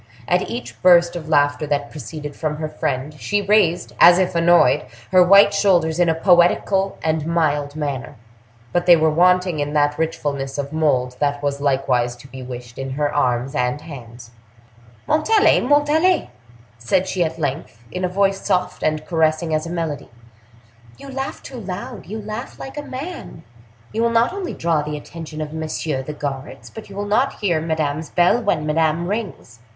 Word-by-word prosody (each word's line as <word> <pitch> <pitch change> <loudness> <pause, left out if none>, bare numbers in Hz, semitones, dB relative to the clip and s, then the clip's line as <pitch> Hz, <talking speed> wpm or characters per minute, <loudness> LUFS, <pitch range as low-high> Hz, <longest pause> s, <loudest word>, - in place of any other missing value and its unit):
At 180 +1 +1
each 240 +1 -7
burst 175 -1 +5
of 160 -2 -6
laughter 145 0 +2
that 145 -1 -2
proceeded 150 0 -8
from 155 -2 -3
her 155 0 -3
friend, 145 -1 -3
she 205 - 0
raised, 200 -4 +2
as 175 0 +8
if 185 -1 +1
annoyed, 170 +1 +4 0.2
her 185 -1 +6
white 200 +3 +6
shoulders 175 -5 +2
in 175 -1 +3
a 160 - +2
poetical 185 +3 +3
and 155 -1 -1
mild 150 -4 0
manner, 145 -3 -4 0.6
but 175 0 0
they 175 - +9
were 160 -1 +2
wanting 180 0 +3
in 145 0 -2
that 145 0 +1
richfulness 140 -4 -3
of 140 +1 -4
mold 130 -5 0
that 145 0 -1
was 140 0 -2
likewise 130 -3 +1
to 125 +2 -15
be 130 -1 -10
wished 125 -1 -9
in 135 0 -4
her 145 +1 -1
arms 125 -1 0
and 125 0 -1
hands. 120 -6 -11 0.7
"Montalais! 415 +8 +3
Montalais!" 295 +6 +2 0.5
said 150 +11 0
she 185 -2 0
at 165 0 -3
length, 140 -6 -4
in 180 - -4
a 180 - +1
voice 195 +1 0
soft 180 0 -1
and 155 0 -1
caressing 160 -1 0
as 155 +1 -1
a - - -6
melody, 165 -6 -4 0.9
"you 275 - -11
laugh 270 0 -5
too 255 - -8
loud—you 210 +1 -7
laugh 215 +4 -7
like 270 - -8
a 295 - -4
man! 290 - -8 0.5
You 225 - -1
will 235 - +3
not 230 +7 +2
only 385 -2 -5
draw 165 -2 0
the 150 0 -4
attention 155 0 -8
of 155 0 -5
messieurs 155 -3 -3
the 150 - -4
guards, 140 -2 -6
but 220 - -10
you 195 - -11
will 205 +1 -3
not 215 +7 +1
hear 175 -6 +1
Madame's 155 -1 -2
bell 180 +7 +3
when 200 -9 0
Madame 160 +2 +1
rings." 200 - -5
160 Hz, 175 wpm, -20 LUFS, 145-190 Hz, 0.9 s, they